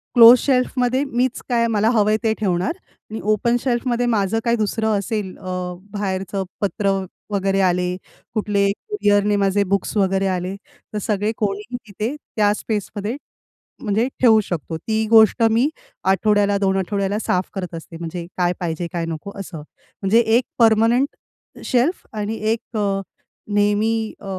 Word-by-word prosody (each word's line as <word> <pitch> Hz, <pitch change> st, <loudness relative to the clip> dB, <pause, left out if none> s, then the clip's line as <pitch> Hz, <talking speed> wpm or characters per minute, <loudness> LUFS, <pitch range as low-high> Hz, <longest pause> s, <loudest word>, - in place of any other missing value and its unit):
Close 235 Hz, +1 st, +10 dB
शेल्फमध्ये 255 Hz, 0 st, +1 dB
मीच 255 Hz, -2 st, -1 dB
काय 235 Hz, -1 st, +2 dB
मला 220 Hz, 0 st, +2 dB
हवंय 215 Hz, -2 st, +3 dB
ते 220 Hz, -1 st, +2 dB
ठेवणार 185 Hz, -3 st, 0 dB, 0.4 s
आणि 220 Hz, -, -4 dB
ओपन 235 Hz, +3 st, +2 dB
शेल्फ 245 Hz, 0 st, -1 dB
मध्ये 245 Hz, 0 st, +1 dB
माझं 225 Hz, -2 st, +1 dB
काही 235 Hz, 0 st, +3 dB
दुसरं 220 Hz, 0 st, 0 dB
असेल 200 Hz, -1 st, -3 dB
अ, -, -, -17 dB, 0.5 s
बाहेरचं 195 Hz, -1 st, -2 dB, 0.2 s
पत्र 200 Hz, 0 st, 0 dB, 0.4 s
वगैरे 195 Hz, 0 st, +1 dB
आले, 180 Hz, -1 st, +1 dB, 0.4 s
कुठले 205 Hz, -2 st, +1 dB
कुरिअरने 205 Hz, -, +1 dB
माझे 200 Hz, 0 st, +2 dB
बुक्स 200 Hz, +1 st, -1 dB
वगैरे 195 Hz, -1 st, +2 dB
आले 185 Hz, 0 st, -2 dB, 0.4 s
तर -, -, -2 dB
सगळे 210 Hz, 0 st, 0 dB
कोणीही 210 Hz, +3 st, -2 dB
तिथे 215 Hz, +7 st, -3 dB, 0.2 s
त्या 210 Hz, -1 st, +3 dB
स्पेसमध्ये, 210 Hz, +1 st, -3 dB, 0.7 s
म्हणजे 220 Hz, +2 st, +1 dB
ठेवू 225 Hz, -3 st, +6 dB
शकतो. 165 Hz, -3 st, -4 dB
ती 220 Hz, +5 st, -1 dB
गोष्ट 220 Hz, 0 st, +6 dB
मी 240 Hz, +6 st, +3 dB, 0.4 s
आठवड्याला, 205 Hz, +1 st, +2 dB
2 195 Hz, -1 st, +1 dB
आठवड्याला 200 Hz, +2 st, -1 dB
साफ 185 Hz, -4 st, -1 dB
करत 185 Hz, -3 st, -5 dB
असते 165 Hz, 0 st, -9 dB
म्हणजे 170 Hz, +1 st, -5 dB
काय 175 Hz, 0 st, +2 dB
पाहिजे 170 Hz, 0 st, -3 dB
काय 170 Hz, -1 st, -1 dB
नको 165 Hz, +4 st, -6 dB
असं 190 Hz, -3 st, -7 dB, 0.4 s
म्हणजे 205 Hz, +4 st, +4 dB, 0.2 s
एक 255 Hz, -, +1 dB, 0.2 s
परमनेंट 230 Hz, +3 st, +4 dB, 0.6 s
शेल्फ 260 Hz, +8 st, +1 dB
आणि 215 Hz, +1 st, -3 dB, 0.2 s
एक 230 Hz, 0 st, -4 dB
अ, 200 Hz, -2 st, 0 dB, 0.5 s
नेहमी 215 Hz, +2 st, +1 dB
अ, -, -, -13 dB
205 Hz, 150 wpm, -21 LUFS, 195-225 Hz, 0.7 s, Close